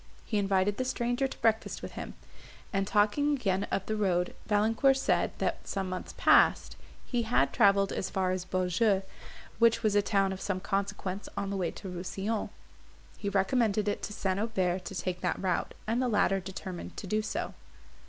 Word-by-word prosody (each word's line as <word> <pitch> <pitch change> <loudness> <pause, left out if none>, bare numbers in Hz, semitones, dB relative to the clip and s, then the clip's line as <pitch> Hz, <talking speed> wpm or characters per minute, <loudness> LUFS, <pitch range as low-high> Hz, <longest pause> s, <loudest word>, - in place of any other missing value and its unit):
He 215 - 0
invited 195 0 +1
the 255 - 0
stranger 255 +1 0
to - - -9
breakfast 225 -1 +1
with - - -5
him; - - -7 0.6
and, 195 -1 0
talking 215 +9 +3
again 195 -6 0
of 195 - -2
the 220 - -1
road, 180 -4 +1
Valancourt 225 +6 +3
said, 270 - +2
that, - - -2
some 195 -2 -2
months 185 0 -5
past, - - +4 0.3
he 245 -2 0
had 180 - +2
travelled 200 -1 +4
as - - -2
far 185 -1 0
as 185 -1 -2
Beaujeu, 185 +2 +1 0.6
which 230 -1 +4
was 215 -2 +3
a 205 - +5
town 195 -2 +1
of 190 - -8
some 195 -2 -1
consequence 200 0 -3
on 200 0 -2
the - - -2
way 180 -3 0
to - - -9
Rousillon. 190 +4 -3 0.7
He 200 - -2
recommended 210 +1 +1
it 205 - -1
to - - -5
St. 195 -2 -1
Aubert 190 -5 0
to 195 - -6
take 180 +1 -3
that 180 - 0
route, 185 -2 -1
and 230 +3 0
the 255 - +1
latter 200 -3 +2
determined 190 -1 -7
to - - -5
do 215 +3 0
so. 215 - -3
200 Hz, 185 wpm, -30 LUFS, 185-220 Hz, 0.7 s, a